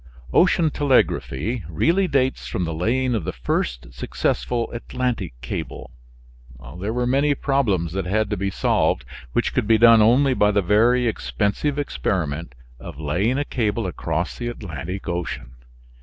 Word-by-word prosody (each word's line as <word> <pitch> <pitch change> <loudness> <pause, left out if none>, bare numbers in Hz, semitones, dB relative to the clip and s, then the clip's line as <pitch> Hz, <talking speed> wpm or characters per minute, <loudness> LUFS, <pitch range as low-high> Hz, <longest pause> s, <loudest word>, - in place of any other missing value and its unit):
Ocean 170 -3 +4
telegraphy 125 - +1
really 170 - +2
dates 130 -4 0
from 90 - -2
the 80 - -3
laying 125 +10 0
of 110 - -1
the - - -2
first - - -3
successful 115 - -1
Atlantic 120 - -3
cable. 60 - -6 0.9
There 100 +4 -2
were 125 +1 -1
many 140 +3 +2
problems 105 - 0
that 95 0 -3
had 110 +2 0
to - - +1
be 100 +1 -1
solved, - - +1 0.3
which - - 0
could - - 0
be 110 0 +5
done 115 0 +7
only 130 +5 +4
by 105 -4 +3
the 100 -1 +2
very 120 +6 +3
expensive 100 - -1
experiment 85 - -2 0.2
of 65 - -9
laying 90 - 0
a 145 - -1
cable 110 -4 -1
across 90 - -3
the 120 - -3
Atlantic 95 - -6
Ocean. 85 -8 -4
110 Hz, 150 wpm, -22 LUFS, 85-125 Hz, 0.9 s, done